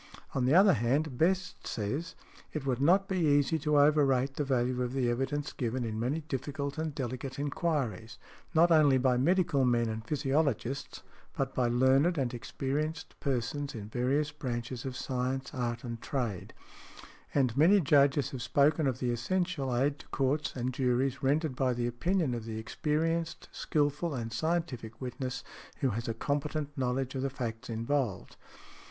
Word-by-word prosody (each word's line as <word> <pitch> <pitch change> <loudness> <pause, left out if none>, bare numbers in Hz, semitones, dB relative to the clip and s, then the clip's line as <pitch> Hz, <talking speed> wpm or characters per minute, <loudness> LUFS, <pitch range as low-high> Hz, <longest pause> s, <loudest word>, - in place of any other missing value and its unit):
On 130 -2 +1
the 135 +5 +4
other 195 +1 +7
hand, 130 +5 0
Best 180 +2 0
says, 130 +10 -3 0.4
"It 150 -3 -4
would 130 -1 0
not 190 +7 +4
be 190 -1 -1
easy 145 0 +3
to 150 0 +2
overrate 140 -3 +4
the 145 - -1
value 125 -2 0
of 125 0 -2
the 125 -3 +1
evidence 135 +4 -2
given 125 0 -2
in 110 -1 -3
many 135 +8 -1
difficult 140 0 -4
and 160 -2 -3
delicate 130 +1 -4
enquiries, 140 - -2 0.4
not 170 +2 +5
only 150 -4 +6
by 130 -1 +2
medical 165 0 +2
men 120 -2 +2
and 110 0 -4
physiologists, 140 -1 -1 0.3
but 135 -1 -1
by 125 -2 +1
learned 130 +8 +3
|111| - - -9
and 130 -3 0
experienced 150 +6 -3
persons 135 +1 -2
in 105 -2 -7
various 135 +6 0
branches 125 -3 -4
of 130 -1 -4
science, 130 +1 -2
art 120 -3 -2
and 115 -2 -6
trade". 120 - -3 0.8
And 130 -5 +2
many 170 +8 +6
Judges 140 -3 +3
have 130 - -5
spoken 145 +3 +3
of 130 -2 0
the 125 -1 -1
essential 135 +1 -1
aid 140 +3 +1
to - - -13
courts 140 +3 0
and 125 0 -2
juries 130 +1 0
rendered 145 +1 +1
by 130 -1 +1
the 120 0 -1
opinion 155 +5 0
of 115 -2 -4
the 110 -1 -5
experienced, 160 +8 -1
skilful 150 +1 0
and 115 -2 -4
scientific 125 -6 -2
witness 130 0 -4 0.4
who 135 -3 +2
has 115 +3 -3
a 115 - -2
competent 145 +3 -2
knowledge 130 -1 -1
of 130 - -2
the 135 - 0
facts 120 -3 -5
involved. 115 -1 -2
135 Hz, 165 wpm, -30 LUFS, 125-150 Hz, 0.8 s, other